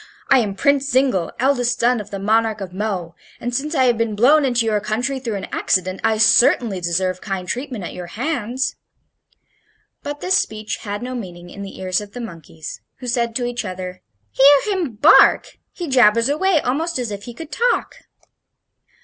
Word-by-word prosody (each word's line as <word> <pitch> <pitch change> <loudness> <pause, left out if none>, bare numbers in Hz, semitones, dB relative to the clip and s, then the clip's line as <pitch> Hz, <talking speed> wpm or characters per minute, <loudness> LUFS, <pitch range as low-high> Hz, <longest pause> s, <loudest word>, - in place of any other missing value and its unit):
I 270 - +6
am 205 -5 -1
Prince 280 +5 +2
Zingle, 255 -10 +1
eldest 250 -2 +1
son 240 0 +2
of 205 - -11
the 200 - -5
Monarch 220 +2 +1
of 190 -3 -7
Mo, 190 -4 -3 0.3
and, 245 +1 -4
since 300 +6 -2
I 265 - +3
have 240 -3 +2
been 225 -2 0
blown 280 +8 +5
into 240 -3 +1
your 215 -2 +1
country 245 +6 -2
through 235 -5 -4
an 195 - -4
accident, 185 0 0
I 220 - +2
certainly 215 -2 +4
deserve 185 +2 -1
kind 190 -3 -4
treatment 245 0 -4
at - - -6
your 180 -1 -7
hands." 255 - -3 1.2
But 290 0 -6
this 375 +3 +2
speech 215 - -4
had 205 +1 -6
no 255 +1 -5
meaning 175 -7 -8
in 200 - -9
the 195 -1 -8
ears 185 +1 -1
of 205 -1 -11
the 245 - -7
monkeys, 165 -7 -9 0.2
who 255 - -10
said 235 -2 -1
to 245 - -1
each 245 0 -3
other: 185 -1 -6 0.3
"Hear 285 +9 +5
him 335 - -3
bark! 290 +10 +5
He 350 - -6
jabbers 230 -2 +4
away 330 +3 +2
almost 315 +7 -1
as 245 -4 -3
if 200 0 -7
he 240 - -9
could 320 +2 -9
talk!" 480 +1 0
230 Hz, 190 wpm, -20 LUFS, 200-265 Hz, 1.2 s, I